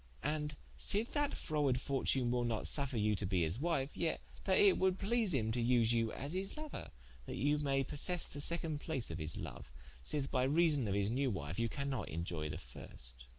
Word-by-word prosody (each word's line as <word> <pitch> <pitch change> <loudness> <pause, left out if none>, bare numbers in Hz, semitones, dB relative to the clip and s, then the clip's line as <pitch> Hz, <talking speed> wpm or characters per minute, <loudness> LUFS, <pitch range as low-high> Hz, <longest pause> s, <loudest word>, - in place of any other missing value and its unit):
And 150 0 -1 0.2
sithe 215 +4 +2
that 290 -1 +1
frowarde 145 -5 +1
fortune 130 -2 +1
will 120 0 +1
not 115 -2 -1
suffre 140 -5 0
you 105 0 +3
to 100 - -2
be 90 -3 +2
his 80 +8 -1
wife, 150 -3 0
yet 165 - 0 0.3
that - - +4
it 410 -3 +6
would 185 0 +3
please 220 0 +1
him 115 -7 +1
to 120 +1 0
vse 120 -1 +4
you 115 -2 +2
as 140 +5 -5
his 190 +1 -3
louer, 305 -1 -6 0.4
that - - -4
you 145 +3 +2
maye 135 -2 +2
possesse 165 +5 0
the 145 - -7
second 165 -1 -1
place 135 - -2
of 80 - -4
his 80 0 -4
loue, - - -6 0.4
sith 135 - -2
by 125 - +2
reason 145 -2 +3
of 100 - 0
his 100 +1 +1
new 135 +2 +1
wife 85 -3 -3
you 115 0 +1
cannot 140 -1 -2
inioy 80 -1 -3
the 75 - -4
first. - - -7
135 Hz, 210 wpm, -36 LUFS, 110-155 Hz, 0.4 s, it